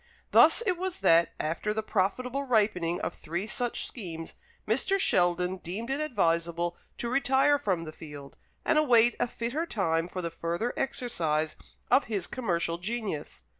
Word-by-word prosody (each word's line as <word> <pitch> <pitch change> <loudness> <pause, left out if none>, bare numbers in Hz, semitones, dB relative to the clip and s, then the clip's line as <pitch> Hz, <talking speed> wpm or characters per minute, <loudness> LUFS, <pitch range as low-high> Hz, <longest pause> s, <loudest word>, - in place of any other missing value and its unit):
Thus - - +6
it 365 -4 0
was 375 0 -3
that, 165 +1 +5
after 170 +7 -2
the 220 - -1
profitable 240 +7 -1
ripening 205 -9 +1
of - - -2
three 175 +5 -4
such 240 +2 -2
schemes, 165 -8 -7 0.3
Mr. 270 - +2
Sheldon 180 - +2
deemed 205 +8 -5
it 275 - -1
advisable 170 - 0 0.2
to 235 - -3
retire 270 +3 +3
from 185 -10 -1
the 155 -1 -8
field, 145 -4 -10 0.3
and 305 - +4
await 240 -5 +5
a - - +1
fitter 245 +8 -3
time 165 - 0
for 180 0 -5
the 170 - -3
further 170 +8 -2
exercise 160 - -1 0.4
of 275 - +5
his 205 -5 -2
commercial 170 -8 -1
genius. 200 - -4
205 Hz, 155 wpm, -29 LUFS, 170-250 Hz, 0.4 s, Thus